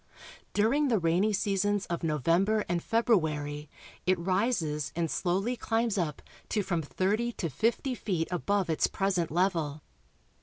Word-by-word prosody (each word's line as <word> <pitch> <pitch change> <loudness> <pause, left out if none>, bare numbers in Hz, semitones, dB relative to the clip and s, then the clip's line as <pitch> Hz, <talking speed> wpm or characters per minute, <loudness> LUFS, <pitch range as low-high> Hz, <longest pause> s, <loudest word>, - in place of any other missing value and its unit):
Dur 215 +4 +3
ing 295 0 +2
the 235 -4 +3
rainy 180 +4 +2
seasons 205 0 +1
of 170 - -3
November 170 +8 +2
and 175 0 0
February 155 - 0 0.4
it 185 0 +4
rises 175 - 0
and 165 -1 -1
slowly 195 +7 0
climbs 225 -2 0
up 160 -7 -2 0.3
to 210 - 0
from 170 -3 -1
thirty 205 +9 0
to 165 -8 -3
fifty 235 - 0
feet 185 -8 -2
above 195 +2 0
its 160 -2 +2
present 190 -4 0
level. 165 -4 0
185 Hz, 145 wpm, -29 LUFS, 165-215 Hz, 0.4 s, it